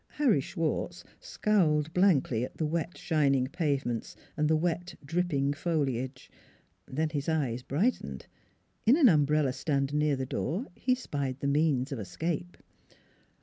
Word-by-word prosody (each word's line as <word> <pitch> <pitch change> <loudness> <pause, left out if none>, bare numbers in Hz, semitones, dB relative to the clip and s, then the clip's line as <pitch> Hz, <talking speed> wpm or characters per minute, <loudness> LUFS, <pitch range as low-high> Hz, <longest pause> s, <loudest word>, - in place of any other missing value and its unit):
Harry 255 - +3
Schwartz 165 +3 -3 0.2
scowled 160 -7 +1
blankly 155 - +3
at - - -6
the 160 - 0
wet, 165 +2 -2
shining 140 -6 +2
pavements 140 -6 -2 0.2
and 150 0 +1
the 160 - +3
wet, 175 +2 -1
dripping 145 -3 0
foliage. 140 -5 -2 0.6
Then 155 +4 -1
his 145 0 -2
eyes 135 -7 0
brightened: 180 - -1 0.6
in. 255 +6 +7
an 305 -6 +7
umbrella 150 -4 +3
stand 140 -1 -1
near 150 -1 +2
the 130 0 -3
door 175 - -2
he 255 -1 +1
spied 140 - -4
the - - -4
means 140 -2 +2
of 135 - -3
escape. 165 - -4
150 Hz, 140 wpm, -29 LUFS, 135-170 Hz, 0.6 s, in